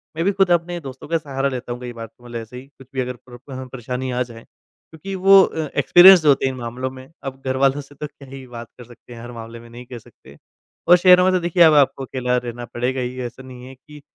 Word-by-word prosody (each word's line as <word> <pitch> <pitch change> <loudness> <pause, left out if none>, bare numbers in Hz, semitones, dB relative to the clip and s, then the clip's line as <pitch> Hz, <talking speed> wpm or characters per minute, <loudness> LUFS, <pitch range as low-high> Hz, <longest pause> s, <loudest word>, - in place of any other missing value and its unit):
मैं, 165 +2 -2
भी 200 - +3
खुद 195 -2 +1
अपने 175 0 0
दोस्तों 135 -4 -10
का 165 +2 0
सहारा 140 -3 -3
लेता 125 -2 -6
हूँ 120 - -9
कई 125 -1 -7
बार 115 -1 -8
तो, 115 +2 -27
मतलब 120 -1 -7
ऐसे 115 +2 -10
ही 130 - -10
कुछ 135 -2 -19
भी 130 - -1
अगर 125 0 -5
प्र - - -14 0.3
अ, - - -7
परेशानी 130 0 -5
आ 125 0 -2
जाएँ 115 -2 -13
क्योंकि 160 +5 -13
वो 195 +1 +6
अ, 160 -3 -3
एक्सपिरिएंस्ड 180 -1 +7
होते 140 -2 +4
हैं 130 - -1
इन 130 - -9
मामलों 125 +2 -5
में। 130 0 -12 0.2
अब 135 -1 -7
घरवालों 135 +2 +1
से 145 +1 -17
तो 150 - -6
क्या 140 -1 -17
ही 135 0 -10
बात 120 -1 -9
कर 125 - -11
सकते 120 +1 -16
हैं, 115 - -11
हर 120 +1 -9
मामले 115 0 -10
में 115 0 -15
नहीं 120 +1 -12
कह 125 0 -9
सकते। 70 -9 -19 0.5
और 175 - +7
शहरों 180 0 +6
में 185 - +2
तो 185 - +2
देखिए 175 0 +3
अब 160 -2 +6
आपको 135 -2 +2
अकेला 125 -1 -2
रहना 120 0 -6
पड़ेगा 125 +2 -2
ही 125 +1 -5
ऐसा 120 +2 -9
नहीं 125 -1 -12
है 135 - -12
कि, 150 +3 -16
130 Hz, 265 wpm, -20 LUFS, 125-150 Hz, 0.5 s, एक्सपिरिएंस्ड